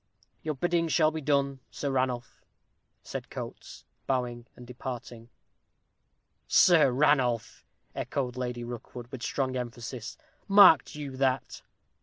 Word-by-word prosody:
"Your 155 Hz, -1 st, -3 dB
bidding 170 Hz, +3 st, +1 dB
shall 155 Hz, -1 st, +3 dB
be 160 Hz, 0 st, -5 dB
done, 140 Hz, -2 st, +1 dB
Sir 140 Hz, -, -3 dB
Ranulph," 130 Hz, -2 st, -2 dB, 0.6 s
said -, -, -6 dB
Coates, -, -, -8 dB, 0.2 s
bowing 120 Hz, -2 st, -2 dB
and 125 Hz, -, -12 dB
departing. 120 Hz, -1 st, -7 dB, 1.2 s
"Sir 165 Hz, -6 st, +6 dB
Ranulph!" 125 Hz, -4 st, +1 dB, 0.3 s
echoed 125 Hz, -3 st, -3 dB
Lady 125 Hz, -1 st, -4 dB
Rookwood, 120 Hz, 0 st, -8 dB
with 130 Hz, -3 st, -7 dB
strong 130 Hz, 0 st, -1 dB
emphasis; 120 Hz, -1 st, -6 dB, 0.3 s
"marked 195 Hz, -8 st, +7 dB
you 140 Hz, -3 st, -6 dB
that?" 135 Hz, -1 st, 0 dB
130 Hz, 115 wpm, -28 LUFS, 120-145 Hz, 1.2 s, marked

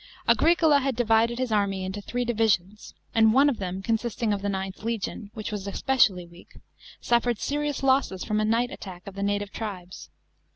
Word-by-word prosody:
Auricola 320 Hz, -3 st, +4 dB
had 270 Hz, -2 st, -1 dB
divided 230 Hz, 0 st, +2 dB
his 255 Hz, -2 st, -2 dB
army 200 Hz, -3 st, 0 dB
into 190 Hz, +2 st, -5 dB
three 245 Hz, +4 st, -3 dB
divisions, 215 Hz, -4 st, 0 dB, 0.2 s
and 220 Hz, -1 st, +5 dB
one 275 Hz, +3 st, +5 dB
of 260 Hz, -, -3 dB
them, 190 Hz, 0 st, -4 dB
consisting 230 Hz, 0 st, -1 dB
of 200 Hz, -, -3 dB
the 205 Hz, -, -2 dB
IXth 190 Hz, -1 st, -4 dB
legion, 220 Hz, -1 st, -4 dB
which 215 Hz, -1 st, -5 dB
was 205 Hz, -2 st, -5 dB
especially 200 Hz, -5 st, +2 dB
weak, 170 Hz, +1 st, -17 dB, 0.4 s
suffered 240 Hz, -1 st, +1 dB
S"rious 290 Hz, +2 st, -2 dB
losses 260 Hz, -8 st, +2 dB
from 210 Hz, 0 st, 0 dB
a 215 Hz, -, +1 dB
night 235 Hz, +3 st, +1 dB
attack 180 Hz, -9 st, -9 dB
of 200 Hz, -, -8 dB
the 200 Hz, -, -6 dB
native 205 Hz, 0 st, -1 dB
tribes. 185 Hz, -5 st, -7 dB
215 Hz, 180 wpm, -26 LUFS, 195-240 Hz, 0.4 s, and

